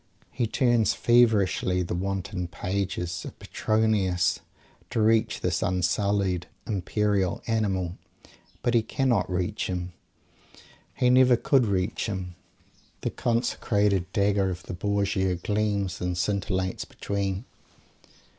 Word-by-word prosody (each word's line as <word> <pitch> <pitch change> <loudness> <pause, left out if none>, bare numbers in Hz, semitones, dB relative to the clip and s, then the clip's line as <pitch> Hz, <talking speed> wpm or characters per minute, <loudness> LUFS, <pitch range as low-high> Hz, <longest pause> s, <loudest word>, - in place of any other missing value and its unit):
He 120 -3 -1
turns 120 -1 +2
feverishly 105 -6 +3
the 85 - -4
wanton 95 0 -3
pages 90 -1 -3
of - - -9
Petronius 105 -6 +1 0.5
to - - -2
reach 110 0 +2
this 90 -1 0
unsullied, 95 0 0 0.2
"imperial" 100 -1 0
Animal. 95 -6 -1 0.6
But 120 - +1
he 115 - +5
cannot 115 -3 0
reach 90 +4 -1
him. 90 -1 -4 1.0
He 125 0 +3
never 125 -1 +6
could 130 -1 +3
reach 95 +3 -1
him. 95 -4 -4 0.7
The - - -2
"consecrated" 105 -5 0
dagger 100 -1 +2
of 90 -1 -5
the 90 - -7
Borgia 100 -1 0
gleams 100 +1 -1
and 90 -1 -1
scintillates 95 -1 -1
between. 100 +1 -3
100 Hz, 110 wpm, -26 LUFS, 90-110 Hz, 1.0 s, never